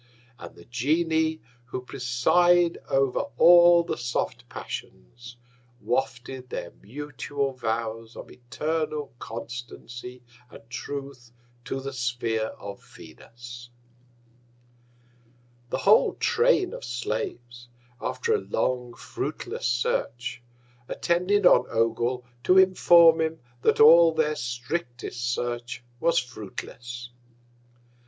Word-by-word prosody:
And - - -10
the - - -15
Genii, 160 +5 0 0.2
who 125 +1 -6
preside 170 +9 +2
over 135 -1 +2 0.2
all 175 0 +7
the 170 - -4
soft 120 0 -3
Passions, 115 - -9 0.4
wafted 125 +1 -3
their - - -5
mutual 140 +3 -4
Vows 115 -2 -4
of - - -10
eternal 150 +3 -3
Constancy 120 +1 -8 0.3
and 115 - -15
Truth 135 -2 -7 0.3
to 135 - -3
the 135 +1 -6
Sphere 120 -3 -1
of 100 0 -9
Venus. 120 +1 -12 2.0
The - - -1
whole - - +4
Train 465 -5 +2
of - - -8
Slaves, 120 0 -5 0.3
after 465 -1 -1
a 435 - +2
long 125 - -2
fruitless - - -4
Search, 120 0 -1 0.5
attended 180 +4 +1
on - - +6
Ogul, 120 +2 0 0.2
to 185 - +5
inform 170 -3 +6
him 160 0 -1 0.2
that - - +2
all 165 +2 +8
their 155 -1 +1
strictest 120 -1 -4
Search 120 0 -4 0.2
was 170 +4 +2
fruitless. 120 - -6
125 Hz, 100 wpm, -26 LUFS, 120-160 Hz, 2.0 s, all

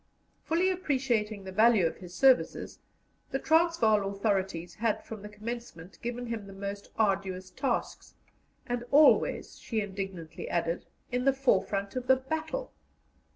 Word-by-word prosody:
Fully 350 +4 +2
appreciating 245 - 0
the 190 - -7
value 215 -1 +5
of 165 - -1
his 180 -2 -11
services, 265 -2 +3 0.5
the 270 - -1
Transvaal 275 -11 +3
authorities 195 -4 -1
had 225 -1 -1
from 220 -2 -8
the 210 - -8
commencement 210 -5 -8
given 240 +1 -4
him 230 -4 -5
the 195 - -10
most 200 +1 -6
arduous 190 -3 0
tasks, 265 -3 -3 0.5
and 245 0 -2
always, 295 +2 +4
she 225 - -2
indignantly 190 -5 -5
added, 170 0 -1 0.2
in 250 +1 0
the 275 - +5
forefront 200 -6 +1
of 255 0 -3
the 260 - +7
battle. 315 - -4
220 Hz, 140 wpm, -29 LUFS, 195-260 Hz, 0.5 s, the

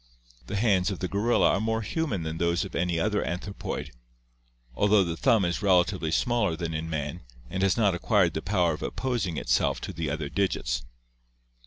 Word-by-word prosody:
The 100 - -4
hands 100 -4 +2
of 95 - -3
the 90 - -3
gorilla 105 +6 +2
are - - +1
more 110 0 0
human 115 - -2
than 80 0 -4
those 85 +3 +1
of 95 - -9
any 85 -1 0
other 105 +3 +1
anthropoid, 95 +3 -4 0.8
although 100 +5 +4
the 85 -2 -3
thumb 115 0 +3
is 85 +2 -1
relatively 90 -3 +2
smaller 105 0 +1
than 85 -1 -4
in 80 +1 -3
man 75 +2 -3 0.3
and 95 - -2
has 95 +1 +2
not 105 -4 +3
acquired 90 0 +2
the 80 - -3
power 90 -3 +1
of 75 - -7
opposing 120 -10 -2
itself - - +1
to - - -5
the 80 -3 -3
other 75 0 -3
digits. 70 -8 -1
90 Hz, 185 wpm, -27 LUFS, 80-105 Hz, 0.8 s, although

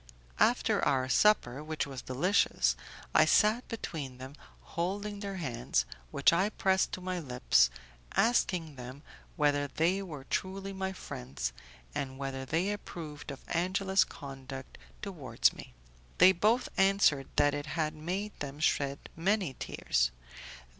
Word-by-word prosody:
After - - +3
our 130 -1 +2
supper, 150 -9 +3
which 155 0 -2
was 135 -3 -7
delicious, 175 - +2 0.4
I - - +6
sat 220 +3 +4
between 150 - -5
them, 130 +2 -9 0.4
holding 200 +4 -2
their 200 -1 -4
hands, 120 - -1 0.2
which - - +4
I 190 +5 +3
pressed 190 -2 +1
to 185 - -4
my 185 0 -2
lips, 125 - +3 0.5
asking 180 - +2
them 130 +4 -9 0.3
whether 145 -2 +2
they 175 +7 +1
were 155 -8 -7
truly 195 +6 -3
my 190 0 -2
friends, 65 - -5 0.4
and 130 -1 -3
whether 135 -1 -4
they 170 +8 0
approved 160 -8 -7
of 140 -1 -8
Angela's 190 +3 +2
conduct 135 -1 -9 0.2
towards 145 - +1
me. - - -12 0.4
They 185 - +8
both 215 +7 +2
answered 195 -8 +4
that 145 0 +4
it 145 +1 -4
had 155 -1 -1
made 180 +7 -3
them 145 0 -5
shed 140 -2 0
many 185 -2 +1
tears. - - 0
155 Hz, 135 wpm, -31 LUFS, 135-190 Hz, 0.5 s, They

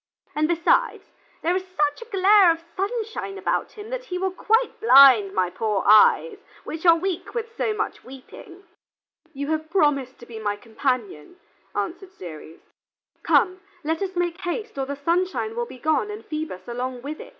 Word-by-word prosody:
And, 305 +1 +1
besides, 340 0 +1 0.4
there 345 +2 +1
is 375 - 0
such 300 -3 -1
a 470 - -10
glare 395 -2 +5
of 330 0 0
sunshine 410 0 -3
about - - -2
him 430 +2 -10
that - - -4
he 360 -6 -4
will 380 +1 -1
quite 450 +6 0
blind 265 - +7
my 185 -2 0
poor 210 -2 -1
eyes, 385 - +5 0.2
which 325 +3 -4
are 335 - +8
weak 365 +5 -4
with 460 -1 -4
so 450 - -1
much 430 +1 -4
weeping." 305 +8 -13 0.7
"You 285 -1 -5
have 315 0 -2
promised 285 -7 +1
to 240 - -13
be 230 -2 -9
my 205 -1 -2
companion," 225 - -3 0.4
answered 365 +2 -4
Ceres. 160 - -11 0.6
"Come, 370 +1 +2 0.2
let 320 +3 -2
us 380 -1 -3
make 350 +1 -2
haste, 425 +5 -4
or 265 - -2
the 280 - -4
sunshine 360 +9 -1
will 475 0 -2
be - - -11
gone 315 - 0
and 420 +1 -8
Phoebus 310 - -6
along 245 +1 -5
with 300 +2 -6
it." - - -10
330 Hz, 175 wpm, -23 LUFS, 265-390 Hz, 0.7 s, are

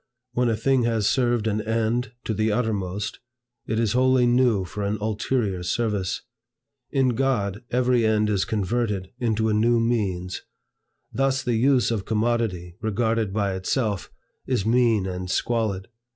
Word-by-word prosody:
When 125 -1 +2
a 115 - +1
thing 130 +3 +2
has 115 -3 +1
served 120 -2 +1
an 110 -1 0
end 115 +2 -1
to 110 - -2
the 110 +1 +1
uttermost, 105 -2 -2 0.5
it 110 +1 0
is 115 -3 +1
wholly 130 0 +4
new 120 -5 +3
for 105 +4 -6
an 100 +1 -1
ulterior 105 -2 -1
service. 100 0 -1 0.7
In 135 -2 +2
God, 115 -5 0
every 125 -1 +2
end 110 -1 +2
is 100 -2 +1
converted 105 -2 -1
into 110 -2 +1
a 110 - +1
new 115 +2 +3
means. 100 -6 -1 0.7
Thus 135 0 +1
the 120 - 0
use 125 +2 +3
of 105 -4 -2
commodity, 110 -6 -1
regarded 110 -1 0
by 100 -1 0
itself, 100 +1 -1 0.4
is 125 -7 0
mean 115 -3 +3
and 90 -1 -4
squalid. 105 -3 -1
110 Hz, 150 wpm, -24 LUFS, 100-120 Hz, 0.7 s, wholly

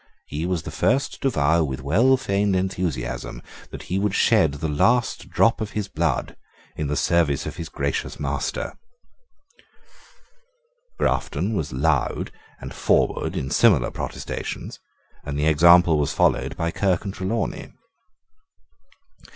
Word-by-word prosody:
He 80 +4 -4
was 90 -4 -1
the - - -6
first 135 +3 0
to 135 - +2
vow 80 - +2
with 65 -3 -4
well 115 - +4
feigned 100 -5 0
enthusiasm 85 -10 -3 0.3
that - - -8
he 95 - -2
would 100 0 0
shed 100 -11 +3
the 80 +3 -3
last 120 - +1
drop 115 0 +2
of 105 -1 -4
his 105 -2 -2
blood 80 -7 -1 0.4
in 75 - -3
the 75 - -1
service 80 -5 +1
of - - -6
his 85 -2 -6
gracious - - -3
master: - - -3 2.2
Grafton 105 +4 0
was 80 -8 -2
loud 65 - 0 0.3
and - - -8
forward - - +1
in 65 - -3
similar 90 - +4
protestations; - - -6 0.4
and 70 0 -4
the 75 - 0
example 85 +1 +6
was 75 +1 0
followed 70 +6 +1
by 85 -1 -1
Kirke 95 +2 0
and 95 - -4
Trelawney. 95 +5 -3
85 Hz, 135 wpm, -23 LUFS, 75-100 Hz, 2.2 s, example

